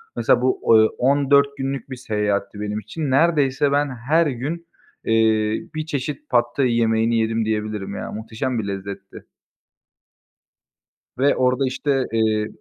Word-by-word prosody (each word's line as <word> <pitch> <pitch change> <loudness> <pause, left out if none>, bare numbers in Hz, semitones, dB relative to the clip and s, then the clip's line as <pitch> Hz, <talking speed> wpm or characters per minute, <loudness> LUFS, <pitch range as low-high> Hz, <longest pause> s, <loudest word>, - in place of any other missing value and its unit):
Mesela - - +2
bu, 380 - +3
eee, - - +1
14 140 +1 +3
günlük 135 -1 -4
bir 130 - -5
seyahatti 105 -3 -2
benim 105 0 -3
için. 135 - -4
Neredeyse 145 -2 +2
ben 145 0 +1 0.2
her 165 0 +4
gün, 145 +7 -4 0.4
eee, 110 -1 +2
1 155 0 -3
çeşit 150 0 -5
Pad 120 -1 +4
Thai 130 -4 +2
yemeğini 115 0 +2
yedim 110 0 0
diyebilirim 105 -2 -3
ya, - - -5
muhteşem 110 +3 -3
bir 100 - -4
lezzetti. 100 0 -7 1.9
Ve 140 +2 +3
orada 130 +1 +1
işte, 135 0 -1
eee 110 -1 +1
120 Hz, 140 wpm, -21 LUFS, 110-140 Hz, 1.9 s, her